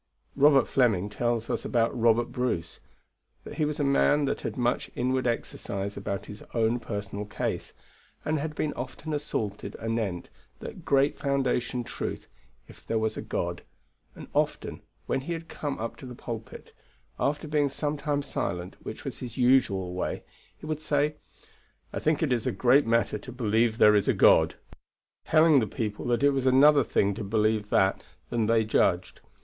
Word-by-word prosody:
Robert 140 -2 +5
Fleming 105 -7 +2
tells 115 +1 -1
us - - -2
about 115 0 +1
Robert 115 0 +2
Bruce, 120 -10 -2 0.6
that - - -9
he 155 - +3
was 150 +1 -3
a - - +2
man 145 +1 +3
that 135 - -2
had - - -4
much 120 0 0
inward 130 +1 0
exercise 100 -3 -3
about 100 0 -4
his 105 - -10
own 115 +1 +2
personal 100 -2 -5
case, 105 - -4 0.5
and 155 0 0
had 150 +1 -4
been 150 0 -1
often 135 +4 -6
assaulted 110 -9 -3
anent 110 -6 -3 0.3
that - - -9
great 140 +1 +2
foundation 130 -3 0
truth, - - -5 0.4
if - - -16
there 115 - 0
was 110 0 0
a - - -4
God. - - -3 0.5
And - - -10
often, - - -1 0.2
when 135 - -1
he 170 +6 -4
had 165 0 -6
come 145 -3 -4
up 115 +1 -5
to 130 - -10
the 125 - -8
pulpit, 115 -2 -8 0.5
after 150 +2 -1
being 145 -1 +2
some 145 +2 -2
time 145 -1 -1
silent, 90 -9 -4
which - - -8
was - - -5
his 125 -1 -7
usual 120 -8 +3
way, 90 - -3 0.3
he - - -11
would 155 -1 -3
say, 150 0 0 0.8
"I - - -2
think 155 0 +1
it 140 -5 +2
is 120 -3 -1
a - - +2
great 130 +1 +4
matter 115 -2 +1
to 125 - -10
believe 115 -1 +1
there 105 -2 +7
is 105 -1 +2
a - - +3
God"; - - +5 0.7
telling 155 -2 +5
the 110 - 0
people 105 0 -4
that 120 +2 +1
it 145 - +6
was 135 -1 0
another 140 +2 +6
thing 100 -3 +1
to 110 - -5
believe 105 0 +1
that 95 0 +2 0.3
than 115 -3 +1
they 115 -1 +3
judged. 95 -4 +1
120 Hz, 175 wpm, -27 LUFS, 110-140 Hz, 0.8 s, there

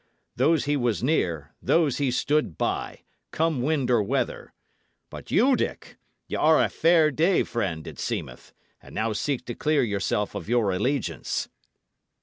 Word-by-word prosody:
Those 155 +5 +2
he 145 0 +1
was 120 -5 0
near, 85 - 0
those 150 -6 +2
he 140 -2 +1
stood 145 - 0
by, - - -3 0.3
come 160 -5 0
wind 140 -2 0
or 120 -3 +4
weather. 100 - -2 0.6
But - - -10
you, 260 +4 +4
Dick, - - -4 0.3
y' - - -9
are 155 0 +4
a - - +1
fair 165 -2 +4
day 170 +6 +2
friend, 90 -9 -3
it - - -9
seemeth, - - -5 0.3
and - - -14
now 110 0 0
seek 130 +3 -2
to 120 - -5
clear 150 +3 +1
yourself 105 -1 -1
of 100 -1 -6
your 115 -5 +2
allegiance." 125 +7 -2
130 Hz, 155 wpm, -25 LUFS, 105-155 Hz, 0.6 s, or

